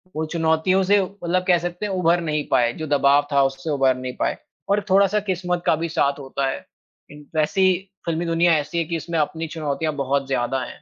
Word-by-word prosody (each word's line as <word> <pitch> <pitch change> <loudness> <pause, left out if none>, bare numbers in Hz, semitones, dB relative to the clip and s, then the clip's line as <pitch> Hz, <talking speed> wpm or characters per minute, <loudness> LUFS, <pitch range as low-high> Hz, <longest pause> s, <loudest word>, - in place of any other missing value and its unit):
वो 160 +1 -1
चुनौतियों 165 +3 +2
से 200 +2 +4
मतलब 185 -1 -2
कह 180 -2 +5
सकते 175 +3 -4
हैं 205 - -3
उभर 175 -1 +2
नहीं 150 -2 -1
पाए, 120 -1 +3
जो 155 +3 -6
दबाव 145 0 +3
था 140 -1 +4
उससे 135 +3 -2
उभर 135 -3 +2
नहीं 130 0 -6
पाए - - 0 0.3
और 205 +1 +2
थोड़ा-सा 200 +2 +4
किस्मत 180 -1 -1
का - - +4
भी 165 +1 -3
साथ 140 -2 0
होता 135 0 -3
है। - - -6 0.5
इन 145 0 -13
वैसी 155 +5 +2 0.4
फ़िल्मी 170 +1 -1
दुनिया 165 0 +3
ऐसी 150 +3 -4
है 170 - +2
कि 170 - -3
इसमें 165 0 -2
अपनी 160 +2 -2
चुनौतियाँ 155 -1 -3
बहुत 140 0 -1
ज़्यादा 130 0 -1
हैं, - - -10
160 Hz, 210 wpm, -22 LUFS, 140-175 Hz, 0.5 s, कह